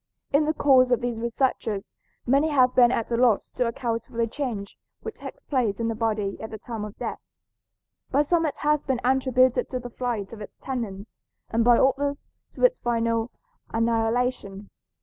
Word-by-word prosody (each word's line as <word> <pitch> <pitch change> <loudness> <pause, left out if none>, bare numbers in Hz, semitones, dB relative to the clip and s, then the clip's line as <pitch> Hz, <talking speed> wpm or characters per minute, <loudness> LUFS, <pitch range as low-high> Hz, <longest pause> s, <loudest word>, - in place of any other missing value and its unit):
In 295 +2 +4
the 310 - +1
course 260 -3 +5
of 245 - +3
these 240 -2 -3
researches 230 -4 -1 0.3
many 275 +5 +3
have 255 -4 +4
been 245 -1 +6
at 230 -1 -2
a - - +2
loss 235 -3 +2
to 250 - 0
account 230 -1 -2
for 230 - -13
the 230 - +2
change 230 -5 -4 0.3
which - - -6
takes - - -10
place 240 -8 0
in 230 0 0
the - - 0
body 215 -3 -2
at 220 - -6
the 220 - -7
time 225 0 -6
of 210 -1 -8
death. - - -4 0.9
By 285 +2 +3
some 330 +1 +2
it 285 - -4
has 300 0 +2
been 260 -3 -1
attributed 255 -1 +2
to 255 - -3
the 245 0 -8
flight 230 -5 -3
of 220 - -9
its 205 - -10
tenant, 225 -6 -5 0.4
and 230 +1 +2
by 240 0 +6
others 280 +2 +1 0.3
to - - -7
its - - +3
final 230 -1 0 0.4
annihilation. 225 -3 -1
240 Hz, 190 wpm, -25 LUFS, 225-265 Hz, 0.9 s, been